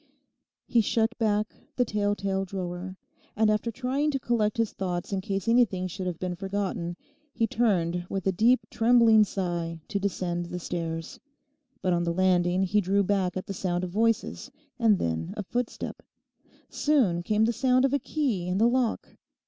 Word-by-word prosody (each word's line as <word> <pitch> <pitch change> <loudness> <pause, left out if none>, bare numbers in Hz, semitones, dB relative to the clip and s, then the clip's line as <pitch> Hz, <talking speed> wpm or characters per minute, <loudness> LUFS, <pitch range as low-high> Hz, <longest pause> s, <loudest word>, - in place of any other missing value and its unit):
He 235 - +3
shut 225 +2 +1
back 215 -1 +1 0.2
the 250 - +2
tell 205 -2 0
tale 195 -1 -1
drawer, 185 0 -5 0.4
and 215 0 +3
after 215 +2 0
trying 260 +5 -1
to 275 -2 -1
collect 225 -4 0
his 230 -2 0
thoughts 180 0 -3
in 190 - 0
case 195 +1 -3
anything 230 -6 +3
should 185 +1 -4
have 175 -2 -3
been 180 0 -3
forgotten, 190 -2 -3 0.4
he 230 - +2
turned 180 -7 0
with 195 -1 -3
a 190 - +3
deep 230 +7 +3
trembling 230 -2 +5
sigh 175 -4 -3
to 200 - -1
descend 175 -3 -2
the 180 - -5
stairs. 165 -2 -4 0.6
But 185 - +2
on 175 0 +1
the 170 0 0
landing 180 0 +2
he 205 +3 +2
drew 200 +2 +2
back 190 -2 0
at 185 - -4
the 195 - -5
sound 180 -1 -2
of 180 - -4
voices, 230 +5 0 0.3
and 220 -4 +4
then 80 - -2
a 205 - -2
footstep. 245 +4 -4 0.7
Soon 245 - +2
came 215 +4 +2
the 235 - +1
sound 255 +2 +3
of 270 - 0
a 285 - +3
key 250 - -1
in 180 +1 0
the 225 +3 +4
lock. 245 -1 0
195 Hz, 180 wpm, -27 LUFS, 180-230 Hz, 0.7 s, trembling